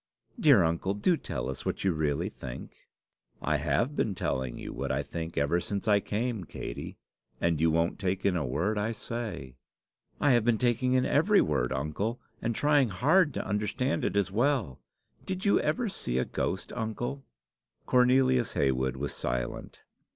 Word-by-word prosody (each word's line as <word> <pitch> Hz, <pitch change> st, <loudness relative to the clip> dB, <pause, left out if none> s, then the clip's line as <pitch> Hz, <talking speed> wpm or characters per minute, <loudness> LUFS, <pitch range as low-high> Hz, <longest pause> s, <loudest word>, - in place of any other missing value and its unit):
"Dear 140 Hz, -, +6 dB
uncle, 85 Hz, +4 st, 0 dB
do 170 Hz, -, +2 dB
tell 65 Hz, -, -4 dB
us 65 Hz, -, -5 dB
what -, -, -3 dB
you 95 Hz, -, +3 dB
really 75 Hz, +2 st, 0 dB
think." 65 Hz, -, -9 dB, 0.5 s
"I -, -, +1 dB
have 130 Hz, +5 st, 0 dB
been 105 Hz, -8 st, 0 dB
telling 65 Hz, -7 st, -2 dB
you -, -, -7 dB
what -, -, -3 dB
I -, -, 0 dB
think 85 Hz, 0 st, -6 dB
ever 70 Hz, +5 st, +2 dB
since 100 Hz, +4 st, -4 dB
I 105 Hz, -1 st, +5 dB
came, 110 Hz, 0 st, -2 dB
Katey; -, -, -7 dB, 0.4 s
and 85 Hz, -2 st, +1 dB
you 80 Hz, -, +4 dB
won't 85 Hz, +4 st, +1 dB
take 95 Hz, -1 st, -1 dB
in 95 Hz, -2 st, +3 dB
a 85 Hz, -, 0 dB
word 85 Hz, -, -1 dB
I 110 Hz, +3 st, -1 dB
say." 105 Hz, -, -6 dB, 0.6 s
"I 145 Hz, -, +4 dB
have 120 Hz, -3 st, +4 dB
been 120 Hz, -1 st, +3 dB
taking 125 Hz, +2 st, +1 dB
in 130 Hz, 0 st, +3 dB
every 200 Hz, +8 st, +4 dB
word, 65 Hz, -5 st, +1 dB
uncle, 75 Hz, -, -2 dB, 0.2 s
and 115 Hz, 0 st, -1 dB
trying 145 Hz, -3 st, +3 dB
hard 150 Hz, -, +3 dB
to -, -, -3 dB
understand 105 Hz, +6 st, -1 dB
it -, -, 0 dB
as 100 Hz, -1 st, +1 dB
well. 115 Hz, -, +1 dB, 0.5 s
Did 190 Hz, +1 st, -3 dB
you 200 Hz, -, +4 dB
ever 165 Hz, +11 st, 0 dB
see 65 Hz, -, -3 dB
a 65 Hz, -, +1 dB
ghost, 95 Hz, -, -3 dB
uncle?" 120 Hz, +4 st, -3 dB, 0.6 s
Cornelius 125 Hz, -1 st, +3 dB
Heywood 65 Hz, -1 st, +1 dB
was 70 Hz, +1 st, -3 dB
silent. -, -, -4 dB
105 Hz, 175 wpm, -29 LUFS, 80-125 Hz, 0.6 s, Dear